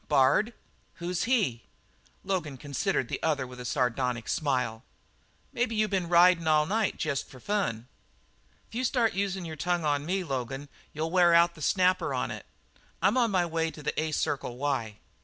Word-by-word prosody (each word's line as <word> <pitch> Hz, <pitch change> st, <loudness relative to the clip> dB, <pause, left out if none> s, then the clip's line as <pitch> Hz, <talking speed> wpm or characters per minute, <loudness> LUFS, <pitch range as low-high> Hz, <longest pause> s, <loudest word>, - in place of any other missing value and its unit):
"Bard? 150 Hz, -, +3 dB, 0.4 s
Who's 175 Hz, +1 st, -2 dB
he?" 205 Hz, -, +1 dB, 0.6 s
Logan 175 Hz, -8 st, -2 dB
considered 145 Hz, -, -1 dB
the -, -, -4 dB
other 150 Hz, -5 st, 0 dB
with 125 Hz, 0 st, -11 dB
a 125 Hz, -, -7 dB
sardonic 125 Hz, -2 st, -1 dB
smile. 125 Hz, -6 st, -1 dB, 0.7 s
"Maybe 235 Hz, -2 st, 0 dB
you 215 Hz, 0 st, +2 dB
been 185 Hz, -4 st, -1 dB
ridin' 175 Hz, -1 st, +5 dB
all 155 Hz, -1 st, +4 dB
night 215 Hz, +4 st, 0 dB
jest 145 Hz, -4 st, -2 dB
for 130 Hz, -, -13 dB
fun?" 125 Hz, -, -2 dB, 0.8 s
"If -, -, -22 dB
you 245 Hz, +3 st, -2 dB
start 235 Hz, -3 st, +2 dB
usin' 195 Hz, -1 st, -2 dB
your 160 Hz, -1 st, -6 dB
tongue 175 Hz, +2 st, 0 dB
on 145 Hz, -1 st, +1 dB
me, 190 Hz, +1 st, 0 dB
Logan 135 Hz, -1 st, -4 dB, 0.2 s
you'll 160 Hz, +2 st, -3 dB
wear 175 Hz, -2 st, +5 dB
out 170 Hz, 0 st, +5 dB
the 155 Hz, -, -14 dB
snapper 185 Hz, +4 st, +2 dB
on -, -, -2 dB
it. -, -, -8 dB, 0.5 s
I'm 195 Hz, +5 st, +3 dB
on 240 Hz, -3 st, +3 dB
my 185 Hz, -3 st, +2 dB
way 165 Hz, -1 st, -1 dB
to 155 Hz, -1 st, -11 dB
the 150 Hz, -, -1 dB
A 160 Hz, 0 st, -2 dB
Circle 140 Hz, -4 st, -2 dB
Y." 130 Hz, -6 st, -2 dB
160 Hz, 175 wpm, -28 LUFS, 135-190 Hz, 0.8 s, ridin